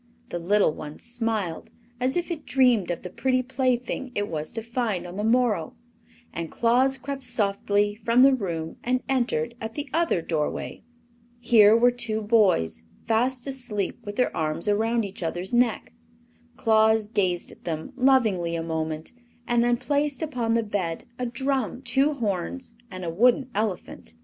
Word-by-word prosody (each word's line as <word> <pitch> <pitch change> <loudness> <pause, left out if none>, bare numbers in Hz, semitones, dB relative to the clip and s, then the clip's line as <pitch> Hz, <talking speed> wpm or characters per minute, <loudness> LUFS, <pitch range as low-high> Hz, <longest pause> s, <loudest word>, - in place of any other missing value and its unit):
The 175 - -3
little 195 -1 +3
one 150 0 -8
smiled, 225 -8 -2 0.3
as 260 +5 0
if 350 0 -2
it 320 -3 -4
dreamed 245 -8 +3
of 175 - -3
the 180 - -6
pretty 255 +4 +1
plaything 255 0 -1
it 205 0 -1
was 155 -3 -4
to 225 - -4
find 230 -6 -2
on 175 +1 -8
the 205 - -3
morrow, 225 -7 +1 0.6
and 165 -1 -4
Claus 255 +3 +2
crept 275 +2 -5
softly 205 -2 0
from 230 +4 +3
the 275 0 +7
room 170 -9 -3
and 255 +1 0
entered 240 - 0
at 220 0 -5
the 290 0 -4
other 330 - +1
doorway. 155 -3 -3 0.6
Here 225 -2 +6
were 245 +1 +5
two 220 -3 -1
boys, 185 - +2 0.2
fast 245 +3 +1
asleep 245 -5 -2
with 205 -1 -6
their 250 - +1
arms 155 +3 -1
around 225 +2 +1
each 195 -1 -8
other's 175 +5 -3
neck. 240 -2 +1 0.6
Claus 220 -1 +3
gazed 185 -5 0
at - - -17
them 160 -2 -4
lovingly 220 -11 +2
a 165 - -2
moment 160 -1 -3 0.4
and 240 -1 +3
then 240 0 +2
placed 290 +1 -1
upon 240 -7 -1
the 230 - +2
bed 190 -6 -3 0.2
a 250 - -1
drum, 260 0 -2
two 270 +4 +3
horns 230 +1 -3
and 185 -2 -7
a 165 - -2
wooden 250 - +3
elephant. 200 - -4
225 Hz, 165 wpm, -25 LUFS, 185-250 Hz, 0.6 s, the